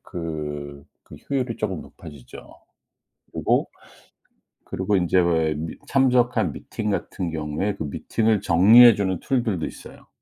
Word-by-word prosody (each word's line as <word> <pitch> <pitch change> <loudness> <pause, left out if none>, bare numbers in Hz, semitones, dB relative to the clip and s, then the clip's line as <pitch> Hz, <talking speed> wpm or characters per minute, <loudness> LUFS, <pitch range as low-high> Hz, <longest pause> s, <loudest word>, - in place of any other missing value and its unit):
그 75 -4 -6 0.2
그 - - -13
효율이 130 -4 -2
조금 95 -6 -3
높아지죠. 75 -6 -13 0.9
그리고 - - 0 1.0
그리고 95 +2 -1
인제 90 0 +1
왜 80 -3 +1
미 80 +2 -5
참석한 125 -2 +2
미팅 105 -2 -5
같은 95 -3 -3
경우에 80 +6 -3
그 100 - -6
미팅을 110 +8 -1
정리해 110 +8 +7
주는 95 -3 -2
툴들도 115 - -1
있어요. - - -12
95 Hz, 270 characters per minute, -23 LUFS, 80-110 Hz, 1.0 s, 정리해